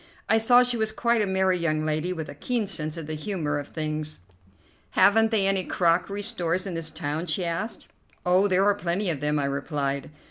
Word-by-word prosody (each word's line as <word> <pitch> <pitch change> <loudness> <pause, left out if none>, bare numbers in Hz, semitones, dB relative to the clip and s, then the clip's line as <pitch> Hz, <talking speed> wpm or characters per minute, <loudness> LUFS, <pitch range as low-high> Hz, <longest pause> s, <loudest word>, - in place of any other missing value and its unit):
I 220 - +4
saw 245 +2 +6
she 245 -1 -1
was 220 -1 0
quite 235 +1 +1
a 205 - 0
merry 190 -1 +1
young 155 -2 0
lady, 155 +3 -1
with 160 -4 -4
a - - -8
keen 230 - -2
sense 155 -5 -4
of 165 - -5
the 155 - -5
humour 155 -3 -2
of 145 - -7
things. 155 - -4 0.8
"Haven't 225 +2 +5
they 215 -3 +3
any 195 -1 +3
crockery 180 +4 0
stores 180 -3 -1
in 190 - -4
this 165 -1 -2
town?" 155 +2 -4
she 175 +3 -1
asked. 170 +7 -4 0.4
"Oh, 185 +3 +4
there 190 0 +3
are 205 - +5
plenty 190 -1 -1
of 150 - -4
them," 150 +1 0
I 145 - 0
replied. 140 0 -2
175 Hz, 210 wpm, -26 LUFS, 155-205 Hz, 0.8 s, saw